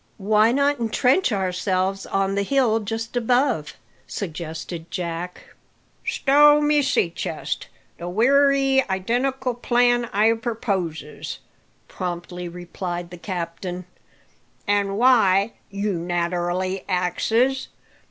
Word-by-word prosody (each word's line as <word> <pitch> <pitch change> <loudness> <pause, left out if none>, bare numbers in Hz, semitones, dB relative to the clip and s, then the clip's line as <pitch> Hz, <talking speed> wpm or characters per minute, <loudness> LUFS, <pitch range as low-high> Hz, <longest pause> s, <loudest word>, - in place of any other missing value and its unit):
"Why 215 +2 +3
not 280 +1 +2
entrench 250 - +2
ourselves 190 0 -1
on 195 0 0
the 200 - +1
hill 230 0 +2
just 225 +2 -5
above?" 245 - +1 0.3
suggested 165 -1 -6
Jack. 175 0 -5 0.6
"Stow 295 +2 +5
my 295 0 +3
sea 270 -11 +1
chest! - - -4 0.3
the 175 +1 -5
wery 270 +5 +4
identical 250 +7 -1
plan 240 0 +2
I 220 +1 +3
perposes," 200 -10 -3 0.5
promptly 175 0 -5
replied 175 0 -6
the 175 - -9
captain. 180 0 -5 0.8
"An' 200 -1 +1
why? 220 -4 +4 0.2
you 200 0 -2
naterally 175 +2 -1
axes. 225 +9 +1
200 Hz, 100 wpm, -23 LUFS, 180-245 Hz, 0.8 s, Stow